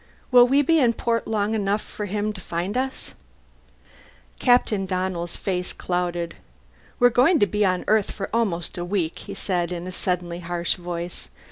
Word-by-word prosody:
Will 245 -1 +8
we 280 +3 +4
be 325 +3 +4
in 240 -4 +4
port 230 0 -1
long 215 -1 0
enough 205 -1 +1
for 210 - -6
him 210 +2 -1
to 190 - -10
find 175 +5 -3
us?" 265 +1 -3 1.3
Captain 225 -6 +3
Donnell's 185 -2 -2
face 180 -2 -2
clouded. 175 -1 -2 0.6
"We're 245 0 +5
going 270 +9 +5
to 205 - +4
be 210 +2 0
on 185 -2 +1
Earth 215 -2 +3
for 195 - -4
almost 185 -7 -1
a - - -2
week," 175 -3 -1
he 200 - -8
said 180 -3 -1
in 175 0 -4
a 185 - -5
suddenly 180 -2 -2
harsh 175 0 -1
voice. 175 -1 -6
195 Hz, 170 wpm, -24 LUFS, 175-220 Hz, 1.3 s, Will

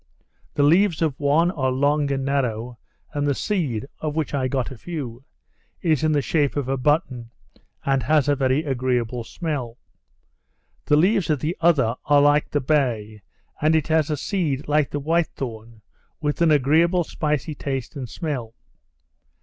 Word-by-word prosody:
The 145 - +2
leaves 170 +2 +4
of 150 -4 -1
one 155 +5 +3
are 130 -7 -1
long 145 +2 +1
and 135 -1 -1
narrow; 125 -4 -2 0.3
and 145 0 -1
the 140 - +1
seed 145 - -1
(of 150 -1 -3
which 160 -3 -2
I 135 -2 0
got 130 -1 -2
a 130 - -8
few) 135 -8 -6 0.6
is 155 -3 +2
in 155 - +3
the 145 -2 +1
shape 145 -2 +1
of 145 -3 -2
a 135 - 0
button, 130 -3 0 0.6
and 135 -1 +2
has 145 +2 +2
a 145 - +3
very 135 +2 +1
agreeable 125 -4 -1
smell. 130 -5 -4 1.1
The 150 - +5
leaves 195 +3 +2
of 150 -3 +2
the 160 +5 -2
other 145 -9 +3
are 145 -1 +5
like 145 +1 +3
the 145 - 0
bay, 120 -7 0 0.4
and 155 +2 +3
it 160 0 0
has 160 -1 +2
a 150 - -1
seed 150 -5 -2
like 150 -1 +2
the 145 - -3
white 165 +3 +1
thorn, 115 -3 -7 0.4
with 150 +1 -2
an 170 - +5
agreeable 160 +5 +3
spicy 150 -1 -2
taste 135 -1 -4
and 130 -4 -6
smell. 130 -9 -4
145 Hz, 170 wpm, -23 LUFS, 130-155 Hz, 1.1 s, The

